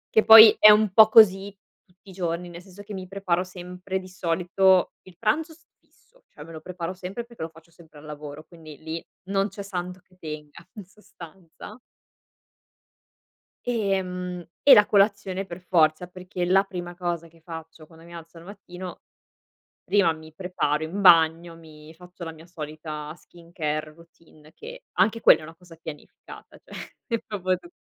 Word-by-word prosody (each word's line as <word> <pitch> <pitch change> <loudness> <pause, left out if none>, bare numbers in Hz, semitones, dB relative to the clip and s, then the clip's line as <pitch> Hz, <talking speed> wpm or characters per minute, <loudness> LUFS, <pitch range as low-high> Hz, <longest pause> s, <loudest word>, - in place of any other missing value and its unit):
Che 220 - +5
poi 220 -1 +10
è 215 - +9
un 210 -2 +3
po' 215 +1 +7
così 200 -3 +5 0.3
tutti 185 0 -23
i 190 - -11
giorni, 175 -1 -4
nel 175 0 -11
senso 190 +2 -14
che 205 - -10
mi 190 -1 -7
preparo 185 -2 -2
sempre 180 +1 -7
di 185 - -12
solito 185 +1 +1
il 180 -2 -18
pranzo 305 +9 0
s 320 +1 -19
fisso, - - -32
cioè 150 - -13
me 165 - -12
lo 155 - -9
preparo 180 +1 -6
sempre 190 +5 -7
perché 235 -5 -15
lo 160 - -4
faccio 165 +1 -20
sempre 160 -3 -18
al 150 - -15
lavoro, 150 0 -9
quindi 160 -4 -14
lì 160 +1 -7 0.2
non 195 +2 -1
c'è 200 - -9
santo 180 -2 -6
che 180 - -28
tenga 150 -3 -10
in 205 -4 -10
sostanza. 185 +1 -14 1.9
E, 205 -5 0
mhmm, 180 -1 -6 0.2
e 285 - +8
la 210 - +6
colazione 195 -2 +1
per 170 - -9
forza, 170 -2 +1
perché 180 0 -6
la 195 +2 +3
prima 175 -2 -7
cosa 175 -2 -4
che 165 0 -24
faccio 160 -1 -11
quando 165 +1 -18
mi 170 - -14
alzo 165 0 -12
al 165 - -13
mattino, 185 -2 -10 0.8
prima 200 -5 +2
mi 160 0 -14
preparo 160 -4 -2
in 185 +6 -5
bagno, 165 -2 +4
mi 155 -1 -15
faccio 180 +1 -13
la 165 - -6
mia 160 0 -15
solita 155 -2 -8
skincare 155 -3 -6
routine 160 -2 -21
che - - -12
anche 230 +1 +1
quella 160 - +5
è - - -11
una 160 +1 -12
cosa 175 -1 -17
pianificata, 160 -2 -12
cioè, - - -11
è 230 -3 -2
proprio 185 -3 -3
tu - - -16
180 Hz, 175 wpm, -24 LUFS, 165-195 Hz, 1.9 s, poi